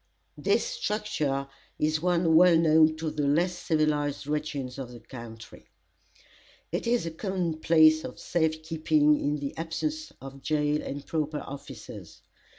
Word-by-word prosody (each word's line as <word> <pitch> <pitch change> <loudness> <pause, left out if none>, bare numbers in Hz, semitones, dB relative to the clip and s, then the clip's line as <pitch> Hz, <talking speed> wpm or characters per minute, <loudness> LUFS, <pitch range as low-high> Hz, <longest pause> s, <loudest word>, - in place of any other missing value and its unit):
This - - +1
structure 210 - -2 0.3
is 155 0 0
one 175 -2 +2
well 175 0 +7
known 160 -1 +5
to 160 -1 -3
the 150 -2 -1
less 175 +5 +2
civilized 150 -4 0
regions 145 -3 -3
of 125 -2 -6
the 120 - -10
country. 115 -1 -11 1.0
It - - -2
is 235 -5 +1
a 165 - -3
common 175 -2 -2
place 155 -1 +5
of - - -7
safe 160 -2 -1
keeping 155 -2 +2
in 145 +1 0
the 140 -1 -5
absence 305 - -3
of 135 0 -10
jail 150 0 0
and 140 0 -6
proper 155 -2 -2
officers. 140 +1 -10
155 Hz, 145 wpm, -28 LUFS, 145-165 Hz, 1.0 s, well